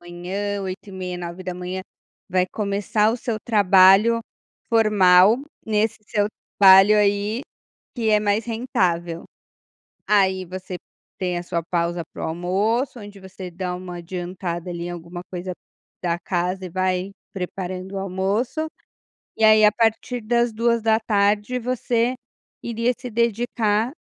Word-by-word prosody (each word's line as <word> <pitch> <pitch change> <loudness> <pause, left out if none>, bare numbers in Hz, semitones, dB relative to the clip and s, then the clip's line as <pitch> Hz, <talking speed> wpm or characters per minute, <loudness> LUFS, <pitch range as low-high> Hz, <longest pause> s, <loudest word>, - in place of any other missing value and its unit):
manhã 190 +4 -4
8:30, 185 -1 -6
9:00 180 +1 -5 0.5
vai 185 0 +2
começar 210 +1 0
o 235 - -1
seu 230 -2 -3
trabalho 200 +1 +5 0.5
formal 210 -2 +5 0.3
nesse 215 0 +1
seu 205 0 +1 0.3
trabalho 195 +1 +8
aí, 205 +4 +1 0.5
que 225 -2 0
é 210 - +5
mais 210 +2 0
rentável. 185 -9 -1 0.8
Aí 190 -2 +3
você 185 +1 -7 0.4
tem 180 -2 -1
a 175 - -4
sua 170 -1 -3
pausa 170 0 -1
para - - -5
o - - -2
almoço, 210 - -1
onde 205 -1 -11
você 190 -1 -9
dá 180 +1 -4
uma 180 -1 -7
adiantada 175 0 -5
ali 170 -1 -5
em - - -4
alguma 175 +1 -8
coisa 180 0 -4 0.5
da 170 -1 0
casa 180 +1 -2
e - - -6
vai 185 +1 -1 0.2
preparando 185 0 -5
o - - -2
almoço. 195 - -1 0.7
E - - -1
aí, 215 0 +7
a 210 - +6
partir 230 +2 0
das 235 +1 +1
14:00, 220 0 +1
você 245 0 0 0.5
iria 235 +1 0
se 250 -1 -7
dedicar, 230 0 0
195 Hz, 130 wpm, -22 LUFS, 180-220 Hz, 0.8 s, trabalho